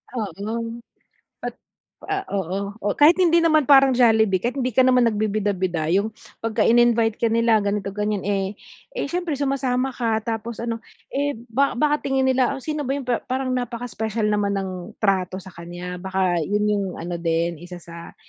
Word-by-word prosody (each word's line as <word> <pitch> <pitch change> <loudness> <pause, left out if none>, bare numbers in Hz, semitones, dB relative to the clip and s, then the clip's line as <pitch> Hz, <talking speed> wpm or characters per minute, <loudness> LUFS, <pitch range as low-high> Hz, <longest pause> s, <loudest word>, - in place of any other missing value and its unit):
Oo. 225 +3 -4 0.6
At - - -4 0.5
ah, 395 -1 -2
oo. 190 -1 -2 0.2
O 205 0 -1
kahit 305 +4 +6
hindi 340 -2 +4
naman 310 -4 +4
parang 275 -2 +7
Jollibee, 220 -5 +4
kahit 240 +5 -1
hindi 255 -2 0
ka 255 +4 +4
naman 250 -1 +5
nagbibida-bida, 200 -6 -1
yung 205 +4 +1 0.3
pagka 225 -1 0
in-invite 235 -1 +4
ka 235 - +3
nila 230 0 +3
ganito, 200 0 -1
ganyan, 210 -1 -1
eh, 195 0 -1 0.4
eh, - - -2
siyempre 350 -3 -1
sumasama 270 -2 0
ka 225 -3 -1
tapos 230 0 -4
ano, 230 -1 -2 0.3
eh, 285 +1 0 0.2
ba 275 +4 +2
baka 295 +3 +2
tingin 270 -1 +1
nila 260 0 +2
o 270 - -9
sino 300 -1 -3
ba 270 - +1
yung 280 - -5
pa 245 - +2
parang 260 0 -2
napaka-special 230 -3 -2
naman 205 -1 +1
ng 195 -1 -2 0.3
trato 190 -3 +1
sa 190 - -11
kanya, 175 +1 -7
baka 190 -1 0
yun 210 +5 0
yung 200 -1 0 0.2
ano 170 +1 -4
din, 170 0 0
isa 180 +1 -9
sa 170 0 -11
225 Hz, 175 wpm, -23 LUFS, 195-255 Hz, 0.6 s, parang